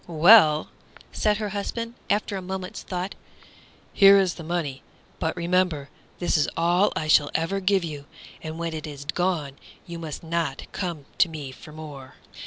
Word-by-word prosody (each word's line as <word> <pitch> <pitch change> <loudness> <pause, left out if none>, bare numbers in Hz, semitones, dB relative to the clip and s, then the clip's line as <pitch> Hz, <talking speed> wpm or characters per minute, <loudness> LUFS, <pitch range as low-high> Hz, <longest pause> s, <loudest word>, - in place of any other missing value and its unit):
"Well," 160 -2 +6 0.4
said 210 -1 +1
her 210 -1 -3
husband, 230 +3 -4 0.2
after 205 0 0
a 190 - -3
moment's 185 0 -5
thought, 185 +1 -4 0.8
"here 200 -1 +8
is 190 -3 +2
the 165 - -9
money; 160 -5 -3 0.4
but 160 +2 -2
remember, 170 -4 0 0.3
this 175 -2 +1
is 145 - +2
all 175 +4 +3
I 155 - -2
shall 150 -1 +5
ever 165 +5 0
give 195 -1 +2
you, 150 -4 -6 0.4
and 155 0 -6
when 165 -1 -3
it 155 -1 -5
is 145 -1 -8
gone 155 -4 -1 0.3
you 170 -1 -7
must 160 -1 -6
not 165 -4 -2
come 170 -7 -4
to 175 - +5
me 150 -4 -7
for 155 - -13
more." 150 -4 -10
170 Hz, 170 wpm, -25 LUFS, 155-185 Hz, 0.8 s, here